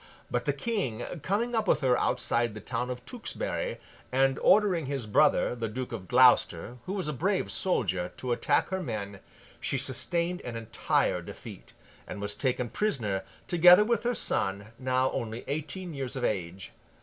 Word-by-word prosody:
But, - - -1
the - - +2
King, 190 - -2 0.2
coming 225 - -1
up 220 -3 0
with - - +3
her 130 -3 +3
outside 120 -2 0
the - - -6
town 125 +4 -3
of 125 0 -6
Tewkesbury, - - -4 0.3
and 135 +1 +2
ordering 185 -8 +4
his 135 -4 -3
brother, 145 +7 +3
the 115 -2 -3
Duke 125 +3 -5
of 105 -6 -6
Gloucester, 125 -1 +4
who 190 - -2
was 190 -5 -2
a 150 - -1
brave 185 +8 0
soldier, 95 - -1
to 125 - -4
attack 120 -1 +2
her 190 0 -2
men, 100 - -5 0.4
she 140 - -1
sustained 170 +7 +1
an 120 -2 -6
entire 115 0 0
defeat, - - -11 0.3
and - - -6
was 105 0 -2
taken 125 -2 -1
prisoner, 115 - -1 0.3
together 180 +3 +7
with 235 -1 +1
her 245 0 0
son, 100 +2 -1
now 130 0 +1
only 115 0 -4
eighteen 155 +5 -4
years 135 -1 -4
of 130 - -4
age. 95 -4 -2
130 Hz, 170 wpm, -29 LUFS, 115-180 Hz, 0.4 s, together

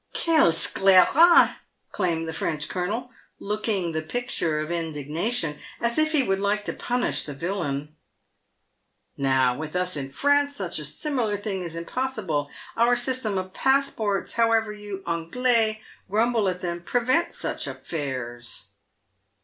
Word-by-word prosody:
"Quel 320 - +4
scelerat 195 - +5 0.2
!" - - -48
exclaimed 165 -2 -1
the 160 - -4
French 150 -1 -2
colonel, 215 +8 -3 0.3
looking 205 -4 -1
the 160 0 -2
picture 165 -4 -2
of 155 +2 -4
indignation 160 - -2
— - - -19
as 235 +4 +1
if 310 0 +3
he 300 -4 +3
would 195 -4 0
like 205 +1 0
to - - -2
punish 245 0 0
the 145 - -6
villain. 150 -3 -3 0.6
" - - -48 0.5
Now, 130 -2 +2
with 155 +4 -6
us 180 -1 0
in 135 -2 -4
France, 285 - +2
such 180 -5 -4
a 150 - -5
similar 230 - -1
thing 200 -2 -3
is 170 -2 -6
impossible. 170 - -2 0.3
Our 235 +1 +4
system 245 -4 -1
of 185 0 -4
passports, 265 -7 +1
however 225 -2 +2
you 205 -2 -7
Anglais 215 +6 +1 0.3
grumble 220 0 +2
at 180 0 -4
them, 175 -1 -3
prevent 250 - +1
such - - -4
affairs." 130 -6 -5
195 Hz, 145 wpm, -25 LUFS, 160-240 Hz, 0.6 s, scelerat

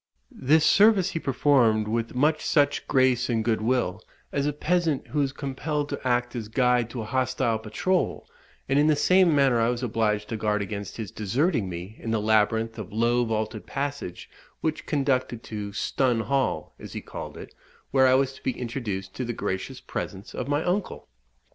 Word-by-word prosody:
This 155 +4 +3
service 200 -2 +5
he 165 - -2
performed 125 -6 +3
with 115 +2 -2
much 150 +4 +2
such 145 -2 +2
grace 130 -2 +3
and 115 -2 0
good 110 -2 +1
will, 110 -4 0 0.3
as 140 0 0
a - - +1
peasant 160 -1 0
who 150 - 0
is 135 -1 0
compelled 145 +2 -3
to 140 - -4
act 120 0 0
as 115 -3 -4
guide 125 0 +2
to 120 -2 -5
a - - -7
hostile 125 -2 0
patrol; 145 - -1 0.4
and 135 +1 +3
in 150 - +4
the 155 - +4
same 180 +2 +4
manner 135 -4 +4
I 115 - +3
was 125 +1 -2
obliged 105 -3 0
to 115 - -3
guard 105 -1 0
against 100 -1 -6
his 110 -4 -5
deserting 115 - 0
me 90 +5 -7
in 115 - -6
the 110 -1 +1
labyrinth 110 +1 +1
of 105 - -7
low 120 +3 +2
vaulted 110 -1 -3
passages 140 -10 -4 0.4
which 155 -1 -2
conducted 130 -5 0
to 105 -2 -5
"Stun 120 +3 0
Hall," 135 +2 -1
as - - -9
he - - -5
called - - -8
it, - - -10 0.4
where 130 -1 +5
I 130 - +5
was 135 0 +1
to - - -15
be 130 - -2
introduced 110 -6 -4
to 130 - -2
the 120 0 -3
gracious 95 -3 -4
presence 95 +3 -6
of 125 - -4
my 145 +2 0
uncle. 185 - -2
125 Hz, 190 wpm, -26 LUFS, 110-140 Hz, 0.4 s, service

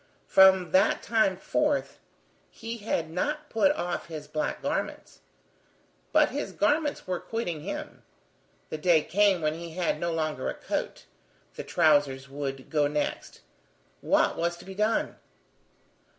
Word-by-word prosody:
From 190 -3 +5
that 185 - +3
time 220 -5 +2
forth, 295 +8 -1 0.5
he 230 +1 -7
had 165 -6 -2
not 295 - -2
put 230 +6 +4
off 175 -10 -3
his 155 -3 -7
black 155 +1 -2
garments. - - -3 0.9
But - - +4
his - - -4
garments 295 0 +1
were 180 -2 -2
quitting 175 -9 -4
him. - - -6 0.7
The 155 - -4
day 160 -2 +4
came 200 -2 +3
when 155 0 +1
he 165 0 -8
had 170 -3 -1
no 170 +1 -1
longer 155 -4 -2
a - - -4
coat. - - -4 0.5
The - - -6
trousers 145 -5 +2
would 135 -1 -6
go 150 -2 +3
next. 150 0 -3 0.6
What - - +2
was 170 +1 -1
to - - -13
be 190 - -8
done? 215 +3 0
175 Hz, 140 wpm, -27 LUFS, 155-210 Hz, 0.9 s, From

